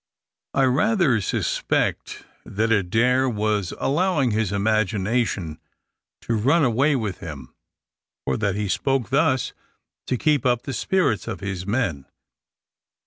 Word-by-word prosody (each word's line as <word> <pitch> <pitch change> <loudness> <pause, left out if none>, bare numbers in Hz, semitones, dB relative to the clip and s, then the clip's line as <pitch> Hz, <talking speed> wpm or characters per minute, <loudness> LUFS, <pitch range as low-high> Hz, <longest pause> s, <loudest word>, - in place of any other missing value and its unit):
I 135 - +3
rather 140 - +2
suspect - - -1 0.2
that 110 +3 -1
Adair 115 +6 +2
was 105 -4 -1
allowing 150 -4 +1
his 105 -2 0
imagination 105 -4 0 0.6
to 115 - -2
run 140 +10 +3
away 135 +5 +2
with 110 -7 -3
him, 70 -8 -9 0.7
or 65 - 0
that 100 -3 0
he 105 0 -2
spoke 135 +4 -1
thus 140 -2 +1 0.5
to 125 - 0
keep 150 +2 +2
up 125 -2 +1
the 135 - -5
spirits 165 - 0
of - - -5
his 95 -1 -4
men. 100 - -1
115 Hz, 125 wpm, -23 LUFS, 100-135 Hz, 0.7 s, I